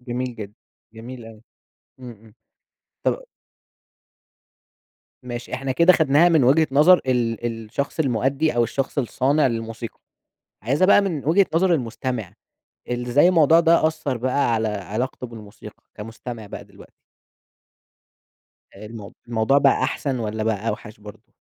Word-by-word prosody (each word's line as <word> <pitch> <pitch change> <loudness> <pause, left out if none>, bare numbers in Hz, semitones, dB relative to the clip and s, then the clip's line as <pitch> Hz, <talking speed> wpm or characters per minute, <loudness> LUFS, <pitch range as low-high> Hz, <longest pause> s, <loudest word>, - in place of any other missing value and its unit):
جميل 125 0 -4
جدًا، 105 -1 -8 0.4
جميل 120 +2 -10
أوي. 110 -1 -14 0.6
إمم، 125 -1 -9
إمم. 110 -1 -18 0.7
طب - - -1 2.0
ماشي 120 -1 -6
إحنا 135 0 -3
كده 170 +6 +5
خدناها 160 +2 +4
من 160 -6 +3
وجهة 155 +5 +4
نظر 155 +6 +6
ال 120 -2 -1 0.2
الشخص 140 +8 -4
المؤدّي، 135 +2 0
أو 120 - +4
الشخص 135 +5 -3
الصانع 140 +3 +1
للموسيقى. 115 -1 -5 0.6
عايزها 140 +10 +2
بقى 205 - +6
من 170 -9 -3
وجهة 180 +6 +4
نظر 180 +1 +3
المستمع. 120 - -4 0.6
ال 125 0 -3
إزاي 145 +8 +4
الموضوع 165 -2 +5
ده 165 -1 +4
أثّر 145 -4 -2
بقى 125 0 0
على 110 -1 0
علاقته 110 +6 -4
بالموسيقى 110 -4 -13
كمستمع 115 +1 -8
بقى - - -9
دلوقتي؟ - - -18 1.8
المو 105 0 -10
الموضوع 115 +4 +2
بقى 140 -1 +3
أحسن 135 -3 -2
والّا 110 -1 -3
بقى 110 0 -1
أوحَش 105 0 -6
برضه؟ 105 0 -14
125 Hz, 130 wpm, -22 LUFS, 115-145 Hz, 2.0 s, نظر